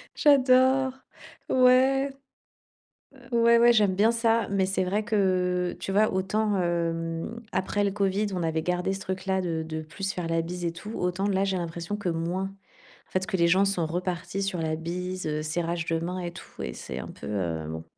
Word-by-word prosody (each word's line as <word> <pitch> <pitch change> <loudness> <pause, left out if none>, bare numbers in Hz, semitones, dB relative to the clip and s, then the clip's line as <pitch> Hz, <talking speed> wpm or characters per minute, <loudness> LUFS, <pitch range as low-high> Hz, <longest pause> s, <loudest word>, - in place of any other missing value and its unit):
J'adore. 260 -2 +4 0.6
Ouais. 260 +2 +4 1.0
Heu, 260 -3 -17
ouais 235 0 +6
ouais, 240 +1 +7
j'aime 210 -4 +3
bien 210 +4 +4
ça. 230 -1 +2
Mais 195 -1 +2
c'est 190 0 0
vrai 205 +4 -1
que 180 -4 +1
tu 195 - -4
vois 215 +2 +3
autant, 195 +1 0
hem, 165 +4 -2
après 190 +2 0
le 200 - +1
covid, 200 +1 0
on 180 - -2
avait 160 -1 0
gardé 180 +2 0
ce 195 - -5
truc 190 0 -5
là 190 0 +1
de 165 -3 -2
de 160 0 -4
plus 165 +5 -8
se 205 - -2
faire 180 -2 -3
la 165 0 +1
bise 175 +1 -5
et 170 - 0
tout 210 +6 -9
autant 180 +3 -1
là, 195 0 +2
j'ai 195 -1 0
l'impression 170 +3 -4
que 205 -3 -3
moins. 170 +3 -1 0.6
En - - -31
fait 185 - +1
ce - - -4
que 205 - 0
les 170 -1 +3
gens 190 +3 +4
sont 195 -4 0
repartis 180 +3 -3
sur 195 -2 -2
la 155 -1 -1
bise, 180 +3 -4
heu, 150 0 -2
serrage 170 +2 -2
de 165 0 0
mains 180 +2 -3
et 175 -1 -4
tout - - -10
et 60 - -4
c'est 65 - -6
un - - -6
peu, - - -9
heu, 85 -6 -2
bon. 80 0 -6
185 Hz, 210 wpm, -27 LUFS, 170-205 Hz, 1.0 s, ouais